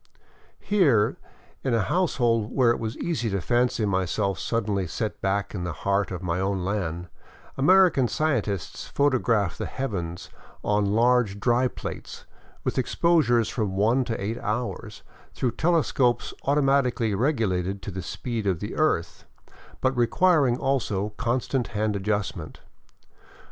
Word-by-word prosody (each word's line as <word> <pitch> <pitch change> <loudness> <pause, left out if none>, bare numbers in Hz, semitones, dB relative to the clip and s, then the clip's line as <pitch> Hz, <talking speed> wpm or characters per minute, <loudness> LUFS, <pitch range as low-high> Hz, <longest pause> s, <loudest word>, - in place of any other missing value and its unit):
Here, 145 - +2 0.5
in 130 -3 +1
a 110 - +2
household 120 - +1
where 125 -3 +3
it - - -1
was 110 0 -4
easy 150 -10 -2
to 100 -1 -1
fancy 120 +2 +1
myself 95 0 0
suddenly 105 -5 -1
set 110 +6 -4
back 100 +1 -1
in 95 -4 -4
the 90 -1 -3
heart 100 0 +1
of 90 -1 -6
my 90 0 -1
own 95 -1 -1
land, 90 -4 -2 0.5
American 160 -3 +5
scientists 110 - -2
photograph 120 -9 +1
the - - -2
heavens 90 -10 -4 0.3
on 105 -1 +1
large 120 -3 +3
dry 120 +4 +2
plates, - - -8 0.4
with - - -1
exposures 130 -5 +2
of - - -7
from 105 -5 -2
one 115 +6 +3
to 115 - -3
eight 110 +4 -3
hours, 120 +4 -4 0.3
through 125 - 0
telescopes 140 -7 +1
automatically 135 -5 +2
regulated 100 - 0
to 100 - -5
the 95 0 -5
speed 115 +3 -4
of 90 -4 +1
the 105 - -5
earth, 85 - 0 0.6
but 130 0 +1
requiring 135 +1 +3
also 115 -7 -1
constant 125 +3 -1
hand 105 0 0
adjustment. 100 -5 -3
115 Hz, 140 wpm, -25 LUFS, 100-130 Hz, 0.6 s, American